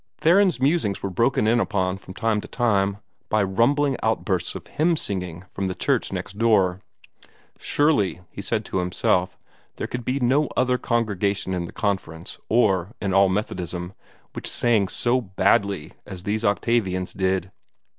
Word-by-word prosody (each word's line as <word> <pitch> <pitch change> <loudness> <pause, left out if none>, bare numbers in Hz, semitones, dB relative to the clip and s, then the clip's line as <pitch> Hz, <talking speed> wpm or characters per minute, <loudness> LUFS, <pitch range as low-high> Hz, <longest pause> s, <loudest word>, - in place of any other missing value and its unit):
Theron's 180 0 +4
musings 135 - +1
were 100 - -2
broken 115 +3 +2
in 115 +2 +3
upon 95 -4 0
from 95 -1 -12
time 115 -2 0
to - - -10
time 100 -5 +1 0.3
by 110 -1 +2
rumbling 130 +8 +2
outbursts 95 -5 -1
of - - -7
hymn 160 +3 +1
singing 90 - -4
from 95 +1 -4
the 90 - -3
church - - 0
next 100 - -6
door. 95 -5 +3 0.8
Surely, 130 - +1
he - - -7
said - - -2
to 95 - -2
himself, 90 +1 0 0.4
there - - -4
could 125 -1 -5
be 130 +4 -1
no 135 +4 +2
other 125 0 +2
congregation 100 -5 0
in 90 -1 -2
the - - -9
Conference, 95 -5 -3
or 105 -3 +2
in 95 -2 -1
all 95 0 +5
Methodism, 90 -2 -3 0.4
which - - -2
sang 115 -5 +2
so 125 +6 +1
badly 100 -3 +1
as 90 -1 -8
these 105 +3 -1
Octavians 100 -4 0
did. 95 -1 -1
100 Hz, 155 wpm, -24 LUFS, 95-120 Hz, 0.8 s, all